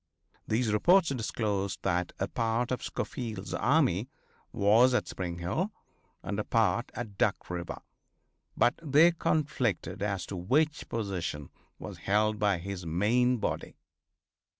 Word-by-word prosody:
These 110 0 +1
reports 175 - +5
disclosed 105 -6 -2
that 90 -2 0
a - - -1
part 115 +2 -1
of 125 - -1
Schofield's 110 -6 -5
army 125 - +2 0.4
was 115 +6 +4
at - - 0
Spring 90 -2 -4
Hill 155 - -2 0.5
and 100 +3 -3
a - - 0
part 115 +2 +1
at 105 -5 -6
Duck - - 0
river, 85 -1 -5 0.7
but 120 - +4
they 155 +2 +5
conflicted 125 - -1
as 100 -3 -1
to 100 - -6
which 145 - 0
position 90 - -3 0.3
was - - -8
held 105 +1 +2
by 100 -3 +2
his 95 +1 -6
main 115 +10 +2
body. 105 - -3
110 Hz, 130 wpm, -29 LUFS, 95-125 Hz, 0.7 s, reports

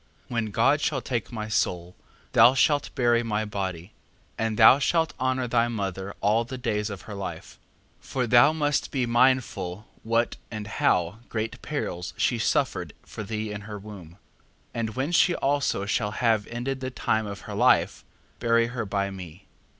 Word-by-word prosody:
4:3. - - -5
When 115 -1 0
God 135 +8 +2
shall 145 -3 0
take 120 -2 -3
my 110 -2 -4
soul, 90 -4 -1 0.4
thou 120 +4 +6
shalt 145 +2 +2
bury 120 -1 +3
my 110 -2 -1
body: 95 -2 -5 0.4
and 110 -1 -2
thou 135 - +8
shalt 160 +2 +1
honour 130 0 0
thy 115 0 +2
mother 100 -3 -4
all 110 +3 +3
the 130 +2 -7
days 110 -4 -1
of 100 -2 -7
her 105 - -8
life: 100 -1 -7 0.4
4:4. - - -22
For 130 -2 -1
thou 120 +5 +6
must 150 -2 0
be 130 -3 0
mindful 115 -6 +1 0.2
what 115 +1 0
and 110 -2 -6
how 90 -1 +1
great 110 0 -4
perils 90 - -4
she 120 - +1
suffered - - 0
for - - -8
thee 105 0 -4
in 105 0 -5
her 105 - -5
womb. 100 -5 -11
4:5. - - -21 0.6
And 110 -2 -3
when 135 +5 -1
she 175 0 +4
also 140 -8 0
shall 105 0 -1
have 110 -3 +1
ended 125 +3 -3
the 130 0 -4
time 110 -4 -1
of 100 -3 -7
her - - -8
life, - - +3 0.4
bury 115 -1 +3
her 115 -4 -3
by 100 0 -1
me. 90 -1 -10
115 Hz, 180 wpm, -26 LUFS, 100-125 Hz, 0.6 s, thou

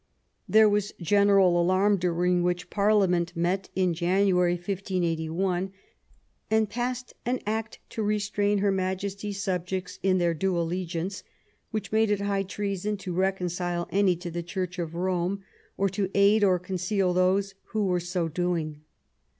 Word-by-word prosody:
There 220 0 +7
was 205 0 0
general 195 -1 +4
alarm, 190 +3 +3
during 180 0 +1
which 175 0 -1
Parliament 195 -4 +2
met 180 +3 0
in 185 -2 +2
January, 180 +1 +2
1581, 180 0 -1 0.8
and 220 0 +3
passed 245 +3 -3
an 250 +2 -1
Act 220 +1 -3
to 225 - -4
Restrain 205 -1 +1
Her 200 0 +2
Majesty's 195 +2 -3
Subjects 180 -1 -3
in 190 -1 +3
their 175 -2 +2
due 180 +3 0
Allegiance," 175 +2 -2 0.5
which 215 -3 -4
made 220 0 +3
it 205 -1 +1
high 200 -1 0
treason 200 +1 -3
to 185 -2 -5
recon 190 +1 0
cile 175 0 -2
any 195 -2 +3
to 175 0 -7
the 170 +1 -3
Church 180 +1 -4
of 170 -1 -4
Rome, 185 +2 -1 0.3
or 195 - +2
to 195 0 -2
aid 200 +2 +5
or 185 -2 +4
conceal 185 +1 -1
those 190 +2 +2
who 215 -2 -1
were 180 -2 +1
so 175 -1 -2
doing. 165 -2 -2
185 Hz, 150 wpm, -27 LUFS, 175-200 Hz, 0.8 s, There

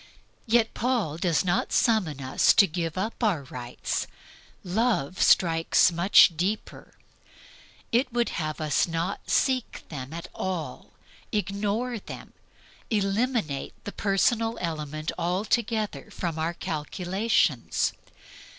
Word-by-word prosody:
Yet 225 0 +3
Paul 230 - -1
does 170 -2 +1
not 175 -1 0
summon 185 - +2
us 130 0 +3
to 200 - +7
give 165 -1 -3
up 215 +5 -3
our 185 -10 +1
rights. 125 -2 -4 0.6
Love 185 - 0
strikes 165 +1 +4
much 170 0 +6
deeper. 190 +6 -3 1.0
It 250 +2 +2
would 240 0 +1
have 155 -2 -3
us 155 0 +1
not 165 +1 -3
seek 260 -3 0
them 135 -3 -6
at 170 +1 -6
all, 185 -4 -5 0.4
ignore 210 +4 -1
them, - - -10 0.6
eliminate 205 - 0
the 205 - -5
personal 225 +4 +1
element 155 -2 -3
altogether 210 +5 -1
from 165 -3 -4
our 165 +2 -1
calculations. 175 - 0
185 Hz, 110 wpm, -26 LUFS, 160-220 Hz, 1.0 s, to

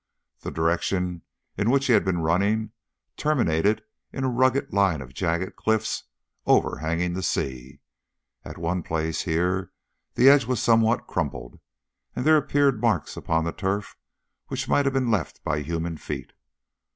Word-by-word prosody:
The - - -6
direction 85 +2 -1 0.4
in 105 +2 +2
which 135 +2 +3
he 125 - +4
had - - +5
been 90 -3 0
running 100 +6 +1 0.5
terminated 105 - +1 0.3
in 135 - -4
a 130 - +1
rugged 130 +3 +1
line 95 -6 +2
of 65 -1 -10
jagged 85 +4 -2
cliffs 110 0 -1 0.4
overhanging 85 +2 +1
the 95 - -3
sea. 65 -4 -3 0.6
At - - -9
one 85 +2 -1
place 80 0 -2
here 90 +2 0 0.4
the 125 - +5
edge 140 -2 +7
was 125 0 -1
somewhat 115 0 +3
crumbled, 70 -7 -4 0.6
and 125 - -3
there 155 0 +6
appeared 140 -5 +2
marks 110 -10 0
upon 80 0 0
the 85 - -2
turf 95 +2 -3 0.5
which - - -4
might 145 - +2
have 135 - +1
been 130 -3 +1
left 100 -7 -2
by 75 - -1
human 80 +2 -3
feet. - - -6
95 Hz, 150 wpm, -25 LUFS, 80-120 Hz, 0.6 s, edge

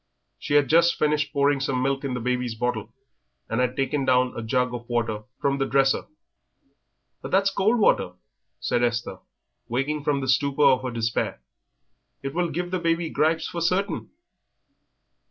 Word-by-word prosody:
She 145 - -2
had 145 -2 +5
just 170 +4 +4
finished 150 0 +1
pouring 140 -1 +2
some 135 -1 -1
milk 135 +1 0
in 135 -3 -2
the - - -2
baby's 125 -1 -1
bottle 120 -1 -2 0.6
and 115 +3 0
had 125 0 0
taken 135 +1 0
down 125 -1 +2
a - - -4
jug 125 +2 0
of 120 0 -7
water 115 -3 -1
from 140 0 0
the 135 - 0
dresser. 135 0 +2 1.1
"But - - -6
that's 195 +1 +3
cold 205 +5 +2
water," 145 - +2 0.5
said 120 - 0
Esther, 120 -1 -1 0.5
waking 140 +5 -1
from 145 -1 +1
the 135 - -4
stupor 140 +3 +2
of 130 -2 +5
her 130 - -3
despair; 115 - -2 0.8
"it 135 0 -4
will 175 +1 0
give 175 +3 -3
the 185 - 0
baby 165 -1 0
gripes 160 +1 +1
for 170 - -5
certain." 185 +2 0
135 Hz, 170 wpm, -25 LUFS, 125-155 Hz, 1.1 s, had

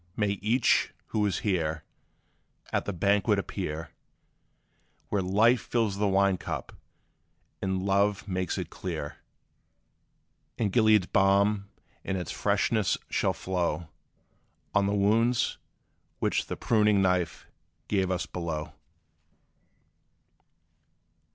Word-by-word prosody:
May 100 -2 0
each, 120 +4 +2
who 110 - 0
is 95 - -1
here, 80 -6 0 0.9
At - - 0
the - - -2
banquet 100 +2 +2
appear, 80 +2 -4 1.2
Where 100 - +1
Life 105 +6 +3
fills 110 -5 -1
the 105 - +2
wine 100 -1 +3
cup, - - -5 0.9
and 95 -1 -1
Love 100 +1 +1
makes 90 -3 -2
it - - -5
clear; 80 -5 -5 1.4
And 105 -4 0
Gilead's 110 -3 +4
balm 100 +1 +2 0.3
in 95 - -2
its 90 -5 -4
freshness 110 -4 +1
shall - - +1
flow 85 -3 -2 0.8
On 100 -1 +3
the 100 - 0
wounds, 115 +5 +2 0.6
which - - 0
the - - -4
pruning 105 -2 +3
knife 90 -3 0 0.4
gave 95 -3 +1
us 90 0 -1
below! 85 -3 -4
100 Hz, 105 wpm, -28 LUFS, 90-105 Hz, 1.4 s, Gilead's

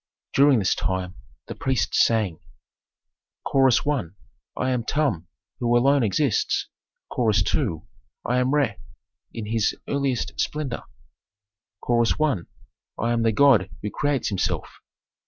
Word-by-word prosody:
During 140 -1 +5
this 95 -4 +2
time 95 -1 -2 0.3
the - - -6
priests 115 -8 +1
sang, 105 -8 0 1.1
Chorus 135 -3 +4
I. 145 -9 +1 0.5
"I 130 0 0
am 125 -2 -1
Tum, 125 - -1 0.3
who 120 -1 +2
alone 135 +3 +4
exists." 120 +3 0 0.4
Chorus 110 -5 +2
II. 80 +1 -1 0.4
"I 125 +1 +1
am 125 +1 +1
Re, 140 -9 +1 0.5
in 115 - -6
his 110 0 0
earliest 140 -3 -1
splendor." 145 -5 -2 1.0
Chorus 120 -1 +2
I. 155 -6 +2 0.6
"I 115 - 0
am 120 -1 +1
the 115 0 +3
god 110 -5 +4
who 105 - -3
creates 145 -4 0
himself." 100 -4 -3
120 Hz, 125 wpm, -24 LUFS, 105-135 Hz, 1.1 s, During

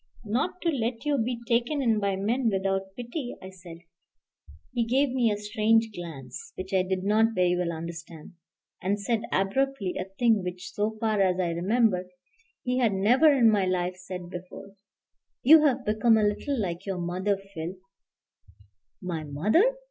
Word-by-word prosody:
"Not 280 - -1
to 340 - +2
let 240 -3 -2
you 290 -2 +1
be 240 +2 -1
taken 240 +5 +1
in 230 -5 +2
by 200 -1 0
men 225 +5 0
without 195 -1 -1
pity," 245 +2 -5
I 190 - -10
said. 180 -3 -12 1.0
He 240 -2 +1
gave 260 +4 +1
me 245 -3 +2
a 205 - -1
strange 220 +2 +2
glance, 150 -9 -8
which 185 +1 -7
I 190 - +4
did 185 0 -2
not 220 +3 +2
very 180 -1 +3
well 175 -1 -1
understand, 165 0 -8 0.5
and 200 +3 0
said 220 +2 0
abruptly, 200 +1 0
a 185 - -2
thing 215 +2 +2
which, 180 0 -6
so 215 +1 -2
far 215 -3 +1
as 185 -1 +2
I 175 -2 0
remember, 185 +1 +1 0.6
he 250 0 0
had 230 -5 +2
never 245 +11 +5
in 240 -6 +5
my 200 -3 +2
life 180 0 -1
said 180 -1 -8
before, 185 +2 -9 0.7
"You've 285 -3 +6
become 220 +2 +3
a 215 - +2
little 220 +6 -1
like 185 -1 -3
your 190 -2 -2
mother, 185 +3 -1
Phil 190 -3 -7 0.7
" 100 -2 -30
"My 160 -1 -3
mother!" 215 - +2
205 Hz, 170 wpm, -27 LUFS, 180-235 Hz, 1.0 s, You've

